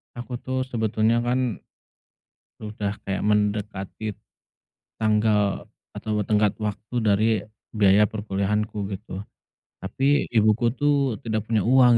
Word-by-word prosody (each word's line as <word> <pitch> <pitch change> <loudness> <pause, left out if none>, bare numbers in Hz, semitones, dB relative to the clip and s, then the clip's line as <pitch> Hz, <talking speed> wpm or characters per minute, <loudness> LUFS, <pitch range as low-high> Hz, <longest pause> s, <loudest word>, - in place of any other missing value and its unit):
Aku 120 0 -6
tuh 130 +1 -2
sebetulnya 110 -2 +1
kan 120 0 0 1.0
udah 105 -1 -4
kayak 95 0 -2
mendekati 105 0 -1 0.9
tanggal 105 -2 +1 0.2
atau 105 -2 -2
tenggat 105 -1 +2
waktu 105 +2 -5
dari 110 -1 +3 0.4
biaya 100 -1 +4
perkuliahanku, 105 0 -2
gitu. 95 -1 -6 0.6
Tapi 135 +9 +1
ibuku 110 +1 +3
tuh, 140 -5 +2
tidak 110 -1 -2
punya 110 -4 +2
uang 125 -1 +6
110 Hz, 105 wpm, -24 LUFS, 105-120 Hz, 1.0 s, uang